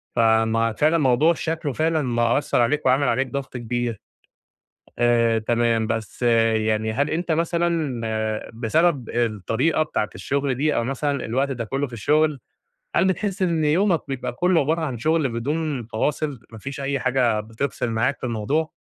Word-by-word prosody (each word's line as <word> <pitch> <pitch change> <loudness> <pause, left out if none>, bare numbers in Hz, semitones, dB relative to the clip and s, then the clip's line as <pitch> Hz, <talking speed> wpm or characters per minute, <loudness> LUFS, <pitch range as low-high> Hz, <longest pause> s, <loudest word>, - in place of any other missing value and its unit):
ف - - 0
ما 115 0 +3
فعلًا 155 +8 +2
موضوع 150 +3 +4
شكله 160 -4 -3
فعلًا 160 +1 +1
مأثر 120 +1 +1
عليك، 150 +5 +1
وعامل 130 +1 +3
عليك 130 +3 +1
ضغط 135 0 -5
كبير، 120 -1 -3 1.0
آآ 115 -1 +3
تمام 115 0 +1
بس 110 +1 -4
يعني 110 -2 +2
هل 140 +5 0
أنت 165 +1 -1
مثلًا 165 -5 0 0.5
بسبب 130 +3 +1
الطريقة 120 - 0
بتاعة 105 -10 -2
الشغل 135 +8 -1
دي 150 +4 0
أو 115 - +1
مثلًا 140 +2 -2
الوقت 135 +5 0
ده 125 -3 -3
كله 135 +5 -2
في 120 - -15
الشغل، 150 +4 +1 0.6
هل 190 - +4
بتحس 195 +1 -1
إن 165 -3 +1
يومك 170 +3 +2
بيبقى 130 -2 -3
كله 175 +5 +2
عبارة 160 +4 0
عن 135 -7 -3
شغل 155 +2 +1
بدون 140 +2 -2
فواصل، 140 +3 -2
ما 110 - -10
فيش 140 +4 -7
أي 140 0 -1
حاجة 125 -4 +1
بتفصل 115 +2 -3
معاك 120 +5 0
في - - -3
الموضوع؟ 130 +8 -1
130 Hz, 160 wpm, -23 LUFS, 115-155 Hz, 1.0 s, موضوع